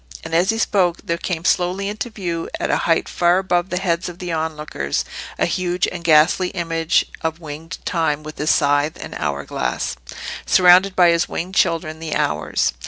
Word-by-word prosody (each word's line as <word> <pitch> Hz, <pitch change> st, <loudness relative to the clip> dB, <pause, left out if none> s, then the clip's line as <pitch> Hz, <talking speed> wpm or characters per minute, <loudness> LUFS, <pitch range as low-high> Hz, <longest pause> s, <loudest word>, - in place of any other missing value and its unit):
And 165 Hz, -, -7 dB
as 175 Hz, +3 st, +3 dB
he 225 Hz, -, +2 dB
spoke 185 Hz, -6 st, +2 dB
there 170 Hz, -4 st, -2 dB
came 170 Hz, -2 st, -3 dB
slowly 180 Hz, +3 st, +1 dB
into 210 Hz, +4 st, -4 dB
view, 175 Hz, -6 st, -4 dB
at -, -, -1 dB
a -, -, +3 dB
height 165 Hz, -, +2 dB
far 175 Hz, +1 st, +2 dB
above 185 Hz, -1 st, 0 dB
the 180 Hz, -, -2 dB
heads 180 Hz, -1 st, -1 dB
of 175 Hz, -, -10 dB
the 180 Hz, -1 st, -5 dB
onlookers, 150 Hz, -, -2 dB, 0.3 s
a -, -, +2 dB
huge 180 Hz, 0 st, 0 dB
and 175 Hz, -1 st, -7 dB
ghastly 165 Hz, +3 st, +4 dB
image 165 Hz, -2 st, 0 dB, 0.2 s
of 160 Hz, 0 st, -2 dB
Winged 160 Hz, +2 st, -8 dB
Time 155 Hz, -3 st, 0 dB
with 155 Hz, 0 st, -9 dB
his 150 Hz, +1 st, 0 dB
scythe 145 Hz, +2 st, +2 dB
and -, -, -7 dB
hour 70 Hz, 0 st, -2 dB
glass, -, -, -2 dB, 0.5 s
surrounded 185 Hz, +1 st, +5 dB
by 175 Hz, -2 st, +6 dB
his 170 Hz, 0 st, +2 dB
winged 180 Hz, +3 st, -4 dB
children, 165 Hz, -4 st, +1 dB
the 160 Hz, -2 st, -4 dB
Hours. 75 Hz, -4 st, 0 dB
170 Hz, 185 wpm, -20 LUFS, 155-180 Hz, 0.5 s, by